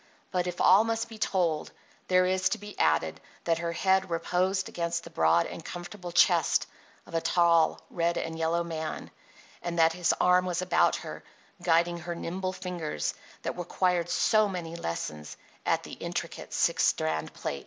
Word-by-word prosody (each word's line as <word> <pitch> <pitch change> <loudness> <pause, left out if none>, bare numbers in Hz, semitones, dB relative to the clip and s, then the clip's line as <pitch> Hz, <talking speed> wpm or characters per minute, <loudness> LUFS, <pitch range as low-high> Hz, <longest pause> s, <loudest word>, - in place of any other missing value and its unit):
But 180 -1 0
if 180 - -4
all 195 +4 +6
must 225 0 -2
be 220 -1 -10
told, 170 -7 0 0.4
there 185 0 +4
is 185 0 +2
to - - -1
be 205 0 -9
added 80 0 +1 0.2
that 165 -1 +1
her 170 0 -2
head 190 +2 +2
reposed 185 +3 0
against 170 0 -2
the - - -11
broad 80 +1 +3
and 165 - -7
comfortable 175 +1 -7
chest - - +4 0.4
of - - -15
a 165 - +1
tall 170 -2 +3
red 170 0 0
and 165 0 -3
yellow 165 +1 0
man, 160 -2 -5 0.5
and 175 0 -4
that 165 0 +5
his 175 -1 +1
arm 180 0 +4
was 175 -2 -1
about 185 0 +3
her, - - -7 0.4
guiding 170 0 +2
her 170 +1 -5
nimble 185 +2 -3
fingers 165 - -3 0.3
that - - -4
required 175 0 0
so 215 +4 +3
many 170 -3 -5
lessons 80 - -5 0.3
at - - +2
the - - -9
intricate - - -5
six - - +2
strand 80 0 0
plait. 70 - -4
175 Hz, 170 wpm, -28 LUFS, 165-185 Hz, 0.5 s, all